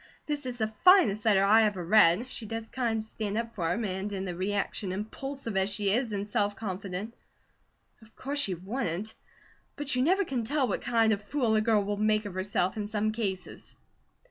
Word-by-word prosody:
That 295 -1 -3
IS 245 -1 -5
the 220 -1 -2
finest 300 - +6
letter 200 -3 +4
I 215 +3 +6
ever 205 -5 0
read; 215 +4 +4
she 220 - -6
does 225 +1 -5
kind 235 -3 -1
of 215 - -2
stand 215 -1 -4
up 230 0 -3
for 170 -4 -1
him; 220 +5 -1
and 190 +1 -3
in 195 -1 -3
the 180 - -4
reaction, 195 +1 -2
impulsive 225 +4 -5
as 190 +1 +2
she 200 -1 0
is 240 0 0
and 205 0 -3
self 205 0 0
confident 195 +1 -5 0.9
of 220 0 -19
course 285 +2 -2
she 195 -10 +1
wouldn't, 195 +1 -4 0.6
but 290 -2 -2
you 250 - +1
never 370 +8 +3
can 255 -6 -2
tell 275 +3 +1
what - - -2
kind 225 -2 +3
of 200 - -3
fool 235 +1 0
a 215 - +3
girl 215 -2 +2
will 205 +1 -2
make 215 0 +1
of 205 - -6
herself, 185 0 -1
in 205 -1 -3
some 215 0 0
cases." 205 -4 -5
215 Hz, 205 wpm, -29 LUFS, 200-235 Hz, 0.9 s, finest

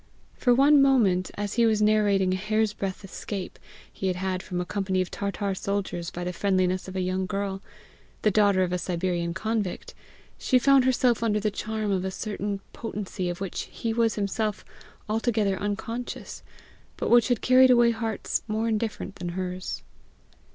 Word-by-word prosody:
For 245 - +1
one 280 +3 +6
moment, 215 -10 +3
as 205 0 -3
he 235 -1 +3
was 215 -1 +2
narrating 205 -3 +3
a - - +1
hair's 215 +2 0
breadth 195 0 -4
escape 195 0 -6 0.3
he 190 - -3
had 185 - 0
had 185 0 -2
from 180 -1 -4
a 180 - -2
company 190 0 -1
of 185 - -1
Tartar 200 0 -2
soldiers 190 -3 -3
by 175 - -6
the 180 0 -3
friendliness 185 0 +1
of 185 - -8
a 190 - 0
young 185 +1 -1
girl, 195 -1 -3 0.6
the 215 - +4
daughter 200 -2 +4
of 180 -1 -1
a 180 - 0
Siberian 175 -1 -2
convict, 215 -1 -2 0.5
she 255 - +3
found 270 +1 +5
herself 250 -2 +2
under 215 -2 +1
the 210 0 0
charm 215 0 -3
of 185 -2 0
a 190 - -1
certain 200 0 -4
potency 200 -5 -4
of 175 +1 -5
which 195 -3 -4
he 225 -1 -3
was 230 -1 +2
himself 210 +1 -2 0.4
altogether 215 -2 +1
unconscious, 220 +4 -4 0.6
but - - -2
which 240 -1 +6
had 245 -3 +1
carried 255 +1 +6
away 240 -1 +6
hearts 225 -2 -2
more 220 +1 -1
indifferent 215 -2 -2
than 175 -1 -4
hers. 185 +1 -4
205 Hz, 175 wpm, -26 LUFS, 185-225 Hz, 0.6 s, one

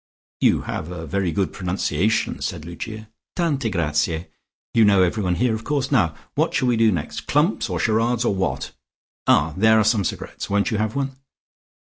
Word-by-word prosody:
"You - - +3
have 80 - -5
a 85 -2 -6
very 95 +1 -1
good 100 +1 -1
pronunciation," 95 +2 -1
said 75 - -4
Lucia. 110 +6 -7 0.3
"Tante 145 -9 0
grazie. 80 -1 -1 0.4
You 115 - +5
know 100 -3 +5
everyone 90 -1 0
here 120 +3 +1
of 110 0 -4
course. 140 0 -1
Now, 90 - +2 0.2
what - - 0
shall 130 - +2
we 120 - +3
do 115 -1 +4
next? 85 -6 -4
Clumps - - +1
or - - -2
charades 115 +2 +1
or - - +2
what? 75 -9 -2 0.6
Ah, 75 +2 +4
there 110 +2 +5
are - - +4
some 110 -1 +2
cigarettes. - - -5
Won't 100 +4 +1
you 110 - 0
have 110 0 -1
one?" 135 -1 -1
100 Hz, 180 wpm, -22 LUFS, 85-115 Hz, 0.6 s, You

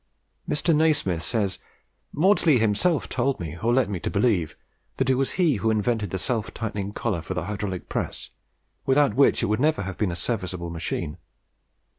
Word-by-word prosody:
Mr. 160 +2 +2
Nasmyth 150 - +2
says 100 +1 -1 0.5
"Maudslay 170 -3 +4
himself 115 - +1
told 130 +2 0
me, 80 -3 -5
or 115 - +2
led 130 0 +3
me 100 -3 -3
to - - -3
believe, 100 -7 +1 0.4
that 130 0 +2
it - - +5
was 135 +1 0
he 165 - +2
who 110 +2 0
invented 110 0 0
the 95 - -2
self 115 +3 -1
tightening 100 -3 -3
collar 105 -5 -2
for 95 +3 -5
the 90 - -2
hydraulic 100 -1 -4
press, - - -4 0.5
without 140 +1 +3
which 140 +1 +4
it - - +3
would 105 +2 0
never 150 -6 +2
have 95 0 -6
been 105 -4 +1
a - - -3
serviceable 90 -5 -3
machine. 85 0 -4
110 Hz, 180 wpm, -25 LUFS, 95-130 Hz, 0.5 s, it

